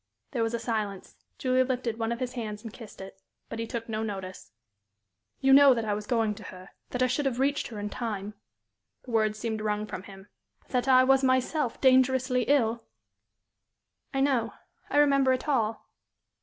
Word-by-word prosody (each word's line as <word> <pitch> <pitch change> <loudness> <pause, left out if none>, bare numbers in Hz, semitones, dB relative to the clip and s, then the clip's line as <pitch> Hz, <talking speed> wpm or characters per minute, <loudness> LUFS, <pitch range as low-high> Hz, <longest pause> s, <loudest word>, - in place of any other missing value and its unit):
There 250 -5 -1
was 225 +1 0
a - - -3
silence. 215 -4 -3 0.2
Julie 255 0 +2
lifted 245 -3 -2
one 225 0 -1
of 235 - -3
his 255 -1 -3
hands 215 -4 -5
and 225 -2 -8
kissed 225 -5 -11
it. 190 0 -11 0.3
But 230 - -6
he 230 - -3
took 230 -1 -5
no 215 -1 -3
notice. 195 -4 -6 0.9
"You 270 -1 +5
know 275 -1 +8
that 230 -1 -2
I 210 - 0
was 210 0 -5
going 225 -3 +1
to 215 +1 -12
her, 185 +1 -11 0.2
that 250 0 0
I - - +5
should 265 +3 0
have 250 -3 -2
reached 280 +2 +1
her 220 -3 -8
in 205 - -3
time" 210 -4 -4 0.7
the 250 - -10
words 215 -1 +1
seemed 220 -1 -3
wrung 210 0 -1
from 195 - -6
him 195 0 -13 0.4
"but - - -26
that 250 0 0
I 255 -1 +6
was 270 +1 +4
myself 260 +1 +1
dangerously 260 -1 +3
ill?" 235 -5 +2 1.3
"I 270 -1 -1
know. 270 -4 +1 0.4
I - - 0
remember 275 -3 +4
it 255 +4 -3
all." 230 -6 0
235 Hz, 195 wpm, -28 LUFS, 215-260 Hz, 1.3 s, know